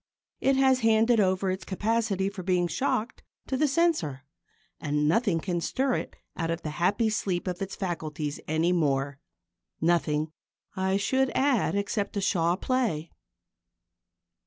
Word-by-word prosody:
It 270 0 +3
has 265 -1 +4
handed 225 0 +4
over 190 -1 +2
its 185 -1 -4
capacity 205 0 0
for 200 -1 -5
being 180 -1 +1
shocked 255 +2 -1 0.2
to 265 - -2
the 300 +3 +2
Censor, 275 - +1 0.6
and 150 0 0
nothing 200 -1 +2
can 175 0 -2
stir 265 +8 0
it - - -3 0.2
out 165 -1 -2
of 165 +1 -2
the 155 - -3
happy 190 +8 +1
sleep 195 -5 -1
of 180 -1 -4
its 195 0 -4
faculties 155 -6 -4
any 160 +3 +1
more 140 -5 0 0.6
nothing, 155 -2 +1 0.4
I 190 +1 +1
should 260 +6 +1
add, 265 -8 +2
except 200 0 -2
a - - 0
Shaw 175 -3 +2
play. 210 -9 -1
190 Hz, 145 wpm, -27 LUFS, 165-225 Hz, 0.6 s, has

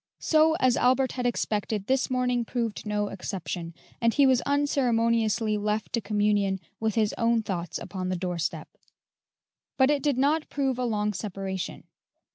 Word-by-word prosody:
So, 315 0 +3
as 255 -6 +2
Albert 260 +1 +3
had 250 -1 -1
expected, 210 -3 -1
this 265 +2 +1
morning 250 -1 +1
proved 230 -3 -3
no 210 -1 -1
exception, 175 -3 -5 0.3
and 230 0 +4
he 280 +3 +4
was 260 -2 +4
unceremoniously 230 -6 +1
left 210 +1 -2
to 230 - 0
communion 205 -2 +1 0.2
with 220 -2 -1
his 215 -2 +2
own 230 -1 +2
thoughts 175 -5 -3
upon 185 -2 -5
the 185 - 0
doorstep; 175 -2 -3 1.1
but 265 +1 +5
it 290 -1 +1
did 285 -3 +1
not 300 +4 +1
prove 270 -3 -1
a 250 - 0
long 210 -2 0
separation. 195 -2 -5
225 Hz, 155 wpm, -27 LUFS, 205-255 Hz, 1.1 s, but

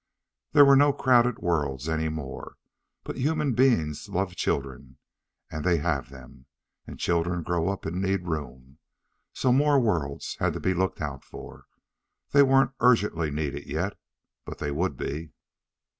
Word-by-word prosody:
There 145 -1 +8
were 140 0 +7
no 145 +1 +5
crowded 125 -3 +3
worlds 75 -5 -1
any 80 0 -1
more. 75 -4 -7 0.5
But - - -6
human 150 0 0
beings 110 - +1
love 95 0 -2
children, 65 -3 -3 0.5
and 80 - -5
they 90 -2 +3
have 75 -4 -1
them. 65 -1 -14 0.4
And - - -9
children 85 0 0
grow 85 +1 0
up 100 - -4
and 90 +3 -3
need 95 -2 -1
room. 70 -3 -6 0.5
So 130 - +1
more 145 +1 +4
worlds 85 - -2
had - - +1
to - - -5
be 95 - 0
looked 95 +1 -1
out 70 -3 -5
for. - - -12 0.7
They 140 - +6
weren't 135 -1 +4
urgently 105 -10 +2
needed 75 -1 -4
yet, - - -2 0.5
but - - -8
they 75 - -3
would 75 -1 -1
be. 75 +4 -5
85 Hz, 155 wpm, -26 LUFS, 75-120 Hz, 0.7 s, There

